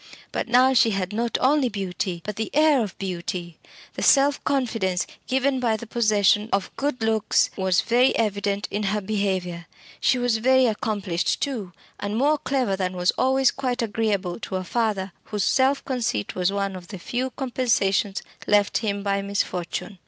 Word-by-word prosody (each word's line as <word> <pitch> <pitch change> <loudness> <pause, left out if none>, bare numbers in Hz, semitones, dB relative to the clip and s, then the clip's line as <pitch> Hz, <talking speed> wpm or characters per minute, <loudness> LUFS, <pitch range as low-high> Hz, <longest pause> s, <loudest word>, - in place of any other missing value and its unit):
But - - -2
now 250 +2 +5
she 230 -2 +5
had 195 -1 -2
not 230 +2 0
only 270 -1 +3
beauty, 185 -3 -3
but 210 - -4
the 220 0 -3
air 305 -3 +5
of 200 -4 -7
beauty. 175 -2 -5 0.3
The - - -6
self 280 0 +4
confidence 225 -9 0 0.2
given 265 +1 +1
by 230 -3 +1
the 235 - -8
possession 210 -2 +2
of 195 0 -1
good 275 -4 -2
looks 220 -1 +2
was 190 -2 +2
very 245 +3 +3
evident 205 -2 -1
in 205 - -2 0.2
her - - -2
behaviour. 190 -4 -2 0.3
She 255 +1 +3
was 245 -2 +1
very 260 +3 +4
accomplished, 210 -6 -1
too, 225 -10 -3 0.3
and 205 +1 -3
more 295 +4 +2
clever 255 -9 0
than 185 -1 -3
was 180 0 +3
always 265 0 +2
quite 250 -3 -2
agreeable 205 -4 -1
to 200 - -5
a 185 - -2
father 205 -2 -1
whose 210 -2 -2
self 270 +4 +2
conceit 235 - -2
was 180 +1 0
one 200 -1 -2
of 180 -1 -9
the 195 - -7
few 245 +8 -3
compensations 230 -7 0 0.2
left 205 -1 +3
him 200 -3 -2
by 200 -1 0
misfortune. 195 -1 -3
210 Hz, 170 wpm, -24 LUFS, 195-250 Hz, 0.3 s, now